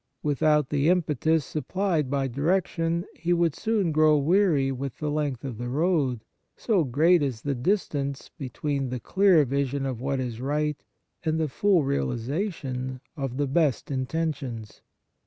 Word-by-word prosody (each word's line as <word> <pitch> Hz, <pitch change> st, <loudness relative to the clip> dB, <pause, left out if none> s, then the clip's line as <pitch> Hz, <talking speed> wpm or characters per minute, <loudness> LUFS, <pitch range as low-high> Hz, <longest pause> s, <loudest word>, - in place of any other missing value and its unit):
Without 150 Hz, 0 st, +2 dB
the 145 Hz, +2 st, +2 dB
impetus 160 Hz, -3 st, +2 dB
supplied 160 Hz, 0 st, -1 dB
by 140 Hz, -1 st, 0 dB
direction, 165 Hz, +4 st, 0 dB
he 175 Hz, +1 st, 0 dB
would 170 Hz, -3 st, +2 dB
soon 205 Hz, -6 st, 0 dB
grow^weary 155 Hz, 0 st, +3 dB
with 135 Hz, -1 st, -5 dB
the 150 Hz, -1 st, -2 dB
length 145 Hz, -4 st, -2 dB
of 120 Hz, -5 st, -6 dB
the 120 Hz, 0 st, -3 dB
road, 140 Hz, -5 st, +1 dB, 0.3 s
so 205 Hz, -8 st, +2 dB
great 155 Hz, +6 st, +3 dB
is 130 Hz, -5 st, -2 dB
the 140 Hz, -, 0 dB
distance 140 Hz, -2 st, -1 dB
between 135 Hz, 0 st, -3 dB
the 125 Hz, 0 st, -3 dB
clear 185 Hz, -1 st, +4 dB
vision 140 Hz, +1 st, -1 dB
of 130 Hz, -3 st, -3 dB
what 135 Hz, 0 st, -1 dB
is 120 Hz, -2 st, -4 dB
right 150 Hz, +2 st, -1 dB, 0.4 s
and 160 Hz, -1 st, 0 dB
the 160 Hz, -, +1 dB
full 185 Hz, +3 st, +2 dB
realization 130 Hz, -, -2 dB, 0.2 s
of 135 Hz, -4 st, -4 dB
the 145 Hz, -, +1 dB
best 145 Hz, -1 st, +1 dB
intentions. 130 Hz, -5 st, -3 dB
145 Hz, 145 wpm, -26 LUFS, 130-165 Hz, 0.4 s, clear